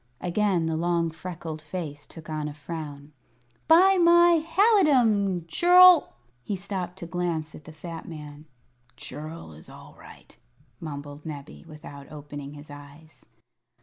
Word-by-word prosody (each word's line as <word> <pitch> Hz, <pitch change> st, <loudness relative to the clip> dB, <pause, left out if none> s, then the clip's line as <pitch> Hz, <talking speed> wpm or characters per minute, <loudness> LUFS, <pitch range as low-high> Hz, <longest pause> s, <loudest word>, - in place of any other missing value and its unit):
Again 180 Hz, -1 st, 0 dB
the 160 Hz, 0 st, -1 dB
long 170 Hz, 0 st, 0 dB
freckled 160 Hz, -1 st, -7 dB
face 150 Hz, -2 st, -7 dB
took 160 Hz, -2 st, -13 dB
on 155 Hz, -1 st, -4 dB
a 145 Hz, -, -7 dB
frown. 150 Hz, -1 st, -8 dB, 0.5 s
"By 370 Hz, +4 st, +6 dB
my 345 Hz, -1 st, +5 dB
halidom, 260 Hz, -, +3 dB
churl 360 Hz, -, +6 dB
" -, -, -37 dB
He 200 Hz, -, -4 dB
stopped 185 Hz, -1 st, -5 dB
to 185 Hz, -, -7 dB
glance 170 Hz, -3 st, -3 dB
at 150 Hz, -, -13 dB
the -, -, -11 dB
fat 165 Hz, +1 st, -9 dB
man. 150 Hz, -1 st, -10 dB, 0.5 s
"Churl 155 Hz, -, -8 dB
is 80 Hz, -, -14 dB
all -, -, -14 dB
right," -, -, -16 dB, 0.4 s
mumbled 145 Hz, -2 st, -8 dB
Nebbie, 145 Hz, +1 st, -9 dB
without 150 Hz, -3 st, -12 dB
opening 145 Hz, -1 st, -9 dB
his 145 Hz, 0 st, -12 dB
eyes. 145 Hz, +2 st, -15 dB
165 Hz, 140 wpm, -26 LUFS, 150-195 Hz, 0.5 s, By